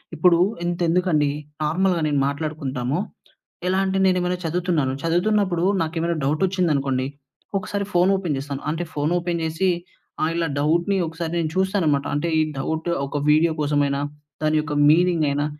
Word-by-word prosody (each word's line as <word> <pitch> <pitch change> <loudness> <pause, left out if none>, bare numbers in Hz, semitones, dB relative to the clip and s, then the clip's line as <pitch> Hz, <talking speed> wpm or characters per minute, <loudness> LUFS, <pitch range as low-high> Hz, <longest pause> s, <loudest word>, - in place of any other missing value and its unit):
ఇప్పుడూ 170 +2 +4 0.3
ఇంతెందుకండి, 170 -3 +1 0.3
నార్మల్‌గా 175 +3 +1
నేను 145 -2 +1
మాట్లాడుకుంటాము. 140 -2 -2 0.7
ఎలా 190 +1 +2
అంటే, 190 0 0
నేనేమైనా 180 -1 +1
చదువుతున్నాను, 165 -5 0
చదువుతున్నప్పుడు 180 +1 +1 0.2
నాకె‌మైనా 165 +1 -1
డౌటొచ్చిందనుకోండి, 150 -5 +1 0.5
ఒకసారి 200 +1 -3
ఫోనోపెన్ 180 -3 +2
చేస్తాను. 140 0 -5
అంటే, 165 +3 -3
ఫోనోపెన్ 170 +3 -1
చేసి, 160 +4 0 0.5
ఆహ్, 160 - +1
ఇలా 165 -2 0
డౌట్‌ని 170 +6 +2
ఒకసారి 160 +1 -5
నేను 160 -2 -1
చూస్తానమాట. 185 -7 +1
అంటే, 155 +4 -1
ఈ - - +4 0.2
డౌట్ 160 +4 -2 0.2
ఒక 145 +1 -3
వీడియో 160 +2 +4
కోసమయినా, 145 -1 +1 0.4
దాని 155 0 +2
యొక్క 150 -1 -5 0.2
మీనింగయినా 155 -3 +3
165 Hz, 125 wpm, -23 LUFS, 150-180 Hz, 0.7 s, ఇప్పుడూ